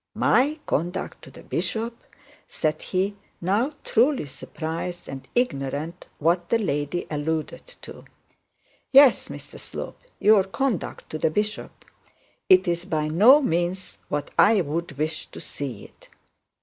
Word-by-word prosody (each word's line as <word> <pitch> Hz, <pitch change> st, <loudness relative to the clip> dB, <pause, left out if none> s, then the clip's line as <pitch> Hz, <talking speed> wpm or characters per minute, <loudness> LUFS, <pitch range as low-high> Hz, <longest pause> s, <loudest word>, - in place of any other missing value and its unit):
'My 290 Hz, +5 st, +3 dB
conduct 175 Hz, +4 st, -2 dB
to -, -, -12 dB
the -, -, -14 dB
bishop,' 230 Hz, +1 st, -3 dB, 0.5 s
said 155 Hz, 0 st, -1 dB
he, 195 Hz, +2 st, -1 dB, 0.2 s
now 210 Hz, -, +1 dB
truly 255 Hz, -, +2 dB
surprised 165 Hz, +5 st, -6 dB
and 135 Hz, -1 st, -8 dB
ignorant 155 Hz, -, -2 dB
what 170 Hz, +3 st, +1 dB
the 230 Hz, -, +4 dB
lady 150 Hz, -4 st, -1 dB
alluded 155 Hz, -, -3 dB, 0.2 s
to. -, -, -10 dB, 0.9 s
'Yes, 275 Hz, -2 st, +7 dB
Mr -, -, -10 dB
Slope; -, -, -7 dB, 0.2 s
your 210 Hz, -2 st, +5 dB
conduct 220 Hz, -, -2 dB
to 155 Hz, -, -4 dB
the -, -, +2 dB
bishop. 210 Hz, +6 st, -3 dB, 0.6 s
It 185 Hz, 0 st, +6 dB
is 170 Hz, 0 st, -1 dB
by 155 Hz, -4 st, -1 dB
no 235 Hz, -, +7 dB
means 175 Hz, 0 st, -1 dB
what 145 Hz, 0 st, -3 dB
I 210 Hz, -2 st, +6 dB
would 165 Hz, +1 st, -3 dB
wish 155 Hz, +3 st, -3 dB
to -, -, -11 dB
see 130 Hz, -8 st, -6 dB
it.' -, -, -17 dB
175 Hz, 135 wpm, -25 LUFS, 155-215 Hz, 0.9 s, Yes